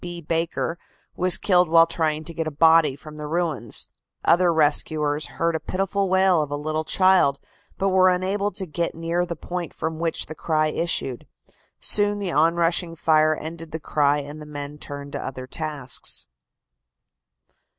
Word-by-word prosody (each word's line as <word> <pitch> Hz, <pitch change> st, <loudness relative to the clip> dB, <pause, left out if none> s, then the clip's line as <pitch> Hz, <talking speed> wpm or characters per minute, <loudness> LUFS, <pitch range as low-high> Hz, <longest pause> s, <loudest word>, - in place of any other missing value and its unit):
B. 175 Hz, -1 st, -6 dB
Baker 165 Hz, +1 st, -2 dB, 0.4 s
was 180 Hz, 0 st, +3 dB
killed 180 Hz, -4 st, +3 dB
while 165 Hz, 0 st, +7 dB
trying 155 Hz, -2 st, -1 dB
to 170 Hz, -, -5 dB
get 160 Hz, 0 st, -3 dB
a -, -, 0 dB
body 160 Hz, -1 st, +4 dB
from 150 Hz, +2 st, -12 dB
the 150 Hz, 0 st, -6 dB
ruins. 155 Hz, -8 st, -1 dB, 0.4 s
Other 175 Hz, +1 st, +4 dB
rescuers 150 Hz, -1 st, +1 dB
heard 170 Hz, 0 st, -1 dB
the 160 Hz, -, -1 dB
pitiful 195 Hz, +2 st, -1 dB
wail 190 Hz, -3 st, +4 dB
of 150 Hz, -, -3 dB
a 145 Hz, -, -2 dB
little 155 Hz, +2 st, -2 dB
child, 185 Hz, -6 st, +3 dB, 0.4 s
but 195 Hz, -, +1 dB
were 185 Hz, 0 st, +5 dB
unable 190 Hz, +3 st, 0 dB
to 190 Hz, -, -4 dB
get 170 Hz, +1 st, -3 dB
near 170 Hz, +2 st, -1 dB
the 170 Hz, -, -4 dB
point 175 Hz, +1 st, -6 dB
from 160 Hz, 0 st, -4 dB
which 165 Hz, -1 st, -1 dB
the 155 Hz, -, -7 dB
cry 155 Hz, 0 st, 0 dB
issued. 150 Hz, -6 st, -2 dB, 0.5 s
Soon 205 Hz, 0 st, +2 dB
the 200 Hz, -3 st, -2 dB
onrushing 165 Hz, +2 st, +2 dB
fire 155 Hz, -1 st, +3 dB
ended 165 Hz, +1 st, -8 dB
the 160 Hz, -, -4 dB
cry 145 Hz, -1 st, +1 dB
and 145 Hz, +1 st, -7 dB
the 150 Hz, -, -10 dB
men 145 Hz, 0 st, -7 dB
turned 140 Hz, -1 st, -7 dB
to -, -, -5 dB
other 130 Hz, -1 st, -6 dB
tasks." 145 Hz, -2 st, -2 dB
165 Hz, 170 wpm, -23 LUFS, 150-175 Hz, 0.5 s, while